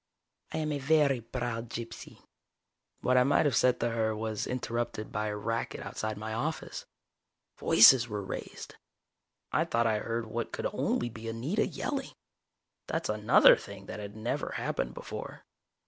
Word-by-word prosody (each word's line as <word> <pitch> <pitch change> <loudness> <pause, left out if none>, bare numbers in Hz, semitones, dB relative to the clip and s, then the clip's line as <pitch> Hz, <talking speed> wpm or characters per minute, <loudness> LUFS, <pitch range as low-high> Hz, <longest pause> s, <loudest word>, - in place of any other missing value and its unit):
I - - -3
am 155 -1 -1
a 145 - -1
very 140 -3 +3
proud 120 -1 -4
gypsy." 115 0 -8 0.8
What 130 0 +3
I 125 - +6
might 140 +4 +3
have 140 -5 +2
said 125 +1 +3
to 120 - +1
her 110 -1 0
was 110 -1 -3
interrupted 120 -3 -3
by 105 +1 -1
a 105 - -2
racket 115 +3 -3
outside 110 -1 -4
my 110 +1 -5
office. 150 +8 -4 0.7
Voices 115 +2 +7
were 105 -3 -4
raised. - - -7 0.8
I - - +3
thought 115 0 +1
I 110 -2 +2
heard 115 +1 -3
what 115 +1 -4
could - - -4
only 120 - 0
be 115 0 -9
Anita 135 - -1
yelling. 275 -2 -4 0.7
That's - - -2
another - - +6
thing - - -10
that - - -7
had 105 0 -7
never 110 +2 -3
happened 60 +1 -2
before. - - -7
115 Hz, 160 wpm, -30 LUFS, 110-130 Hz, 0.8 s, Voices